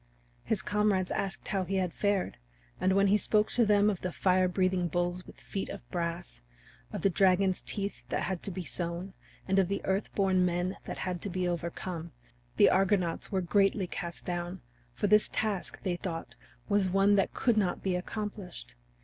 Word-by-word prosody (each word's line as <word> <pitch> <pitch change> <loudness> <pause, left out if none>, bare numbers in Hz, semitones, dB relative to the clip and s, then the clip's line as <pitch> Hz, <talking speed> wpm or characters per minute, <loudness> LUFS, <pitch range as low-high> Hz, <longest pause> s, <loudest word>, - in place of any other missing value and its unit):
His 220 -3 -1
comrades 205 -3 +1
asked 195 -1 -3
how 195 -2 0
he 195 +2 -3
had 185 -3 0
fared, 200 -2 0 0.4
and 190 - +2
when 195 +1 +4
he 205 +2 +4
spoke 210 0 +2
to 235 -3 +3
them 205 0 +5
of 200 -4 0
the 180 - -2
fire 185 +1 +3
breathing 185 -1 +1
bulls 175 +2 -2
with - - -13
feet 195 - -4
of 200 - -8
brass, 170 - -3 0.5
of - - -5
the 195 - +5
dragon's 190 0 +3
teeth 200 -1 -3
that - - 0
had 190 -3 -2
to - - -4
be 185 -1 -4
sown, 175 +2 -4 0.3
and 195 0 +3
of 190 - +3
the 200 +2 -1
Earth 190 +2 0
born 190 -2 +3
Men 180 +1 0
that - - -5
had 180 -2 -3
to 205 - -3
be 180 0 -1
overcome, 170 -1 -4 0.4
the - - +7
Argonauts 190 -3 +1
were 190 -2 +1
greatly 195 +2 +2
cast 170 -1 -6
down, 175 +1 -3 0.3
for - - -1
this 210 +1 +5
task, 210 -4 -2
they 180 -3 -1
thought, 165 -2 -5 0.3
was 200 -2 +2
one 195 +2 +4
that 195 -1 +2
could 240 -3 +2
not 190 -5 0
be 190 -2 +1
accomplished. 200 0 -5
185 Hz, 190 wpm, -30 LUFS, 180-200 Hz, 0.5 s, the